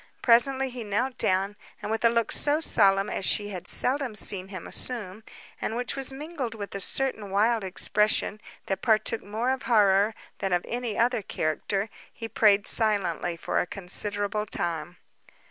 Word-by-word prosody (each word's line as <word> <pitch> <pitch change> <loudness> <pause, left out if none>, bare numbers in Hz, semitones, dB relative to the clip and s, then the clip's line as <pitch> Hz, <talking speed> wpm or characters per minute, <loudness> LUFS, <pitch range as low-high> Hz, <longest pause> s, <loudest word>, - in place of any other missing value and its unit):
Presently 260 +2 +4
he 245 -1 -6
knelt 230 +5 -2
down, 195 +2 +1 0.2
and - - -5
with 225 +1 -2
a 230 - +6
look 230 0 0
so 295 +1 +2
solemn 195 -9 +4
as 195 - -3
she 205 +2 +2
had 185 -4 -7
seldom 260 -3 0
seen 190 -3 -2
him 185 -3 -8
assume, 220 -4 -2 0.4
and 220 - -2
which 245 -1 -1
was 270 -1 -2
mingled 275 -4 -5
with 205 -2 -7
a 200 - -4
certain 220 0 0
wild 215 +3 +2
expression, 210 +2 0 0.2
that 195 - -3
partook 225 0 +2
more 220 +5 -1
of 265 -1 -2
horror 205 -1 +4 0.2
than 195 -2 -1
of 175 - 0
any 240 -2 -3
other 240 0 +2
character, 195 +4 -2 0.2
he 230 - -7
prayed 210 -2 +3
silently 200 -5 +1
for - - -1
a - - -1
considerable 205 +3 -1
time. 175 -2 -3
215 Hz, 165 wpm, -26 LUFS, 195-240 Hz, 0.4 s, a